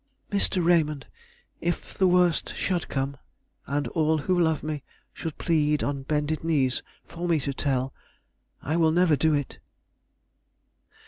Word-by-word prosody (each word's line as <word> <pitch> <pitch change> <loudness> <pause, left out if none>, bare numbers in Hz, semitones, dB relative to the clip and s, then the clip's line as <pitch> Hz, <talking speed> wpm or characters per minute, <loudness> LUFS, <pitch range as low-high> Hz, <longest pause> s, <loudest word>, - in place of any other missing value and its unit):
"Mr. 190 -3 +1
Raymond, 155 -5 +2 0.5
if 175 +1 -3
the 190 - +3
worst 180 -2 +2
should 180 -3 -1
come, 135 0 -2 0.5
and 145 +1 -1
all 160 -1 +2
who 180 +4 +1
love 160 -3 +2
me 150 -1 -3 0.3
should 160 -3 -6
plead 150 -3 +1
on 140 -1 -2
bended 150 +2 -1
knees 140 -6 +1 0.2
for 175 +1 -5
me 165 -3 +3
to 140 +1 -2
tell, 135 -1 -1 0.7
I 155 +4 0
will 160 -2 +4
never 170 -2 +4
do 155 +2 +2
it." 145 -2 -3
155 Hz, 140 wpm, -26 LUFS, 145-170 Hz, 0.7 s, will